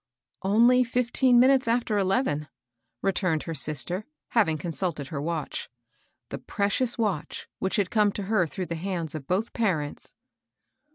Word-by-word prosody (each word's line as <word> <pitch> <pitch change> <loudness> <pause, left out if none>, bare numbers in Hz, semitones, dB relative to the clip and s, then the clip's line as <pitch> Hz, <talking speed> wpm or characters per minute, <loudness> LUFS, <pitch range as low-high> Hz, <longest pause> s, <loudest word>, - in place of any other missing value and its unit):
"Only 235 +6 +5
fifteen 245 +1 +3
minutes 260 0 +5
after 230 -2 +1
eleven," 190 - +1 0.6
returned 185 -5 +1
her 165 - -4
sister, 155 +7 -1 0.2
having 180 -10 +2
consulted 160 -3 -3
her 140 -3 -4
watch, 160 0 -3 0.3
— - - -43
the - - -4
pre 200 0 -1
cious 245 +3 0
watch 205 -9 -2
which 190 - 0
had 200 -4 0
come 210 -2 +3
to 205 - -4
her 195 -3 +1
through 180 +6 -4
the 170 - -4
hands 170 -2 -3
of 150 -4 -7
both 200 +6 -1
parents. 170 -11 -2
190 Hz, 155 wpm, -26 LUFS, 160-230 Hz, 0.6 s, Only